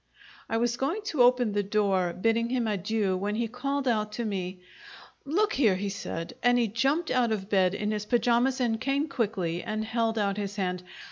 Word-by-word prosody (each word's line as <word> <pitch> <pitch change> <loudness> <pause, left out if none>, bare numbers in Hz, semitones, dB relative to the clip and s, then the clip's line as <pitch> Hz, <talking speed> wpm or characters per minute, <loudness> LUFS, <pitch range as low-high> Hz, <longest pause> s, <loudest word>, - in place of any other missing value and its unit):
I 225 - 0
was 240 +1 0
going 335 +11 -1
to 310 -10 0
open 245 -2 +4
the 205 0 +1
door, 195 -3 +1
bidding 225 +6 +1
him 245 -2 0
adieu, 205 -1 0
when 205 +3 -2
he 235 +1 0
called 275 +4 -2
out 215 -3 +1
to 235 +2 -3
me. 185 -3 -4 0.6
"Look 400 +9 +1
here!" 225 -8 +3
he 200 +2 -2
said, 165 -4 -5
and 245 +1 +4
he 235 -2 +2
jumped 270 - 0
out 245 -3 +2
of 200 -2 -3
bed 190 -1 +3
in 210 +1 -1
his 210 -1 -2
pajamas 240 +3 +2
and 225 -3 0
came 275 +3 0
quickly, 195 - -1
and 215 -1 -3
held 225 0 0
out 200 -1 0
his 200 -1 -3
hand. 180 -3 -2
225 Hz, 200 wpm, -28 LUFS, 200-245 Hz, 0.6 s, open